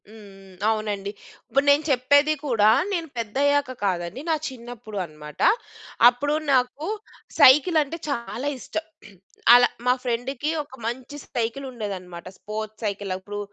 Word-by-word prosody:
హ్మ్. 220 - -14
హ్మ్. 195 -2 -15 0.2
అవునండి. 210 -2 -2 0.4
ఇప్పుడు 275 +1 +2
నేను 285 +2 +5
చెప్పేది 285 +4 +4
కూడా 220 -6 +4 0.2
నేను 335 -3 -2
పెద్దయ్యాక 275 +5 +1
కాదండి 180 +5 -2
నా 320 - +3
చిన్నప్పుడు 235 -4 -9
అన్నమాట. 150 -2 -11 0.7
అప్పుడు 285 +5 -1 0.2
నాకు 260 +5 +1 0.5
సైకిలంటే 300 +2 +5
చాలా 245 0 -3
ఇష్టం. 320 +5 -5 0.7
అలా 245 0 +8 0.2
మా 250 - +6
ఫ్రెండుకి 250 +4 -2
ఒక 290 - -22
మంచి 260 +4 -5
సైకిలుండేదన్నమాట. 220 -8 -5
Sports 215 +1 -6
cycle. 200 -1 -3
అప్పుడు 205 +2 -7
240 Hz, 120 wpm, -24 LUFS, 205-280 Hz, 0.7 s, అలా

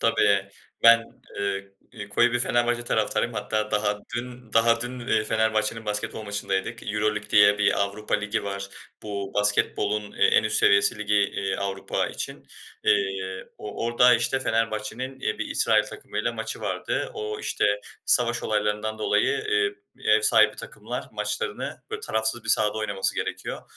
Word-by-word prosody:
Tabii, 100 -1 +3 0.3
ben, 115 0 +8 0.4
ııı, 100 -1 -1 0.3
ııı, 105 -2 -7
koyu 120 +4 +3
bir 120 - +2
Fenerbahçe 120 0 +1
taraftarıyım. 115 +1 0
Hatta 105 +1 -2
daha 105 0 +1 0.2
dün 125 -1 -7
daha 115 0 +4
dün, 125 +1 -5
eee, 110 -3 +2
Fenerbahçe'nin 110 0 0
basketbol 105 +1 -3
maçındaydık. 105 +2 -3
EuroLeague 105 0 -1
diye 105 -1 +6
bir 100 0 +2
Avrupa 100 +2 -1
Ligi 105 +1 -1
var. 100 0 -4 0.3
Bu 100 -2 -5
basketbolun, 105 0 0
eee, - - +1
en - - +4
üst - - 0
seviyesi 100 +3 +4
ligi, 105 0 0
iii, 100 -1 +1
Avrupa 95 -1 -2
için. - - -7 0.4
Eee, 95 -1 0
o 105 +1 -5
orada, 125 +1 +5
işte, 120 +3 0
Fenerbahçe'nin, 115 +3 -2
iii, - - -2
bir - - -2
İsrail - - +3
takımıyla 105 +3 -4
maçı 115 -1 -5
vardı. - - -2
O, 105 0 -4
işte, - - -1 0.4
savaş - - +2
olaylarından 105 +1 -1
dolayı, 445 - +2
eee, 430 -1 +2 0.3
ev 430 - +5
sahibi 435 - +5
takımlar - - -6
maçlarını, 470 -2 -3
böyle, 440 -1 -4
tarafsız 110 - -1
bir - - -9
sahada 105 0 +3
oynaması 100 -3 -1
gerekiyor. - - -4
105 Hz, 150 wpm, -25 LUFS, 105-120 Hz, 0.4 s, ben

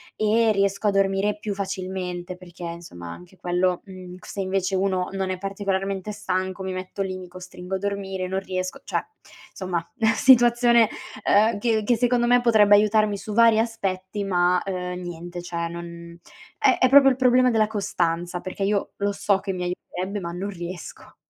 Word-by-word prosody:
e 220 +1 +3
riesco 200 +1 0
a - - +4
dormire 195 +1 +1
più 210 -1 -3
facilmente 185 -2 -4
perché, 180 -1 -12
insomma, 170 - -7
anche 180 +1 -13
quello 180 0 0
mhmm, 185 -2 -10
c - - -16
se 200 - -7
invece 190 0 -1
uno 185 -1 0
non 190 -1 -2
è 185 - -3
particolarmente 195 0 -3
stanco, 185 -1 -3
mi 190 0 -3
metto 185 +2 -5
lì, 185 -1 -2
mi 185 -1 -9
costringo 180 +1 -7
a - - 0
dormire, 195 -2 -3
non 190 +1 -1
riesco 185 -1 -4
cioè - - -2 0.5
insomma, 175 -3 -4 0.2
situazione, 240 -2 +5 0.4
uhm, 215 +1 +4
che 220 -1 +1
che 235 +3 +2
secondo 240 0 +2
me 245 0 +5
potrebbe 215 -4 +6
aiutarmi 210 0 +3
su 200 +2 -7
vari 230 0 +5
aspetti, 200 -3 -2
ma, 180 -2 +2
uhm, 180 -2 -4
niente 175 0 -7
cioè 170 -1 -3
non 170 0 -9 0.4
è 420 - +4
è 255 - +4
proprio 270 0 +8
il - - 0
problema 255 0 +4
della 220 -2 +3
costanza, 175 -4 -2
perché 190 +1 -5
io 200 0 0
lo 200 0 0
so 200 0 +1
che 195 -1 -4
mi 180 -1 -4
aiuterebbe, 185 +2 -4
ma 170 -2 -5
non 190 +3 -4
riesco. 175 -2 -8
190 Hz, 180 wpm, -24 LUFS, 180-210 Hz, 0.5 s, proprio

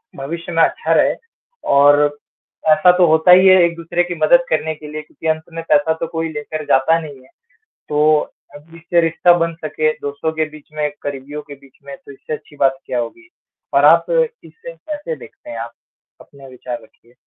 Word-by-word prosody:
भविष्य 165 +6 -6
में 165 -1 +1
अच्छा - - 0
रहे। - - +3 0.6
और 145 +1 +4 0.5
ऐसा 155 +4 +6
तो 180 - +5
होता 160 +3 +4
ही 185 +1 +7
है 185 -1 +7
एक-दूसरे 170 +1 -1
की 175 0 -5
मदद 260 +12 +4
करने 160 0 0
के 150 0 -12
लिए 155 0 -5
क्योंकि 155 +1 -9
अंत 160 - -14
में 165 0 -6
पैसा 150 +2 +3
तो 165 - -1
कोई 165 0 -3
लेकर 150 +1 -6
जाता 145 +4 +3
नहीं 145 -4 -10
है। 130 - -22 0.6
तो 150 +1 +3 0.4
अब 155 +3 -15
इससे 170 +1 0
रिश्ता 165 +2 +3
बन 165 0 -1
सके 155 0 0 0.2
दोस्तों 145 +3 -3
के 155 - +2
बीच 155 -1 -15
में 150 -1 -1
करीबियों 145 +1 -6
के 145 - -8
बीच 135 -1 -22
में 140 -1 -8
तो 180 - -15
इससे 140 +2 -8
अच्छी 150 - -9
बात 135 -1 +2
क्या 125 - -2
होगी? 120 - -7 0.5
और - - +4
आप - - +6 0.4
इसे 485 +2 -12
कैसे 310 +3 -6
देखते 305 - -15
हैं - - -6
आप? 120 - -7 0.5
अपने 140 -1 -16
विचार 125 -1 -7
रखिए। 120 +2 -24
155 Hz, 195 wpm, -18 LUFS, 145-170 Hz, 0.6 s, ही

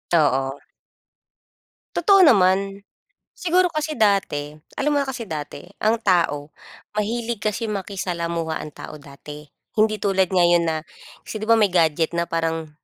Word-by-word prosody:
Oo. 135 -3 +1 1.4
Totoo 385 +3 +5
naman. 195 - +3 0.5
Siguro 360 +1 +2
kasi 310 0 -2
dati, 195 -9 +1 0.2
alam 295 +2 +1
mo 285 - +3
na - - -5
kasi 255 -3 -4
dati, 155 -1 -7 0.2
ang 220 +2 +3
tao 155 -6 +1 0.4
mahilig 230 +2 -2
kasi 215 +2 -1
makisalamuha 170 -5 -3
ang 155 - -7
tao 155 - -9
dati. 145 +1 -11 0.3
Hindi 215 0 +3
tulad 190 -2 +2
ngayon 175 -2 +4
na 160 - 0 0.5
kasi, 215 - -6
'di 215 - -4
ba 230 - +6
may 210 -4 +3
gadget 165 -2 +2
na 170 0 -1
parang 165 -1 -2
190 Hz, 140 wpm, -22 LUFS, 160-220 Hz, 1.4 s, ba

